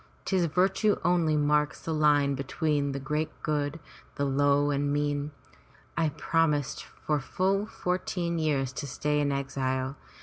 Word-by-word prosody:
'Tis 185 -3 +2
virtue 190 +5 +2
only 170 -3 +3
marks 150 -1 +2
the 165 - -3
line 145 -2 +3
between 140 +1 -1
the 135 - -3
great 150 +3 -1
and - - -28
good, 150 +1 -1 0.4
the 140 - 0
low 145 +1 +3
and 145 0 0
mean. 145 0 0 0.7
I 165 -2 +2
promised 150 -3 0 0.2
for 150 -1 +2
full 195 +8 0
fourteen 180 -3 -2
years 140 -4 0
to 140 +1 -5
stay 150 +2 0
in 145 -1 +1
exile. 135 -1 -2
150 Hz, 145 wpm, -28 LUFS, 140-165 Hz, 0.7 s, only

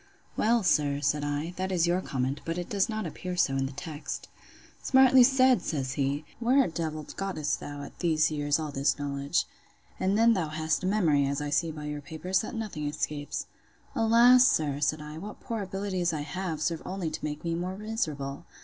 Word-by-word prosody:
Well, 230 0 +2
sir, 145 -5 +2
said 145 +1 0
I, 145 +4 -2
that 190 +1 -2
is 175 -2 +2
your 175 +2 +1
comment; 135 -2 -2
but 165 +1 -3
it 175 - -5
does 200 +1 +1
not 215 -2 -2
appear 180 +3 -5
so 135 -5 +2
in 135 0 0
the - - -7
text. 150 +2 -6 0.5
Smartly 265 -1 +6
said! 260 0 +5
says 135 -4 -2
he: 140 +2 -1
Where 255 +4 +4
a - - -1
d—l 155 -2 -4
gottest 155 -7 -2
thou, 145 0 -7
at - - -11
these 160 -3 +2
years, 145 -1 +1
all 155 -2 -4
this 140 +2 +1
knowledge? 140 -1 -1 0.5
And 195 +2 +1
then 230 +1 +5
thou 180 -6 0
hast 155 +3 -1
a - - 0
memory, 160 -9 +3
as 140 +1 -1
I 145 0 -3
see 165 +3 +1
by 150 -1 -7
your 150 0 -4
papers, 160 +6 -1
that 220 - -6
nothing 200 -10 -4
escapes. 145 0 -3 0.5
Alas! 240 +3 +6
sir, 145 -3 +1
said 150 +1 0
I, 150 +1 -8
what 210 +4 -8
poor 225 -2 -4
abilities 190 -3 -2
I 155 - -2
have, 155 +1 -3
serve 165 +2 -1
only 185 -4 -3
to - - -6
make 150 0 -4
me 170 -1 -1
more 180 +3 -3
miserable! 155 -11 -4
160 Hz, 205 wpm, -28 LUFS, 145-195 Hz, 0.5 s, Smartly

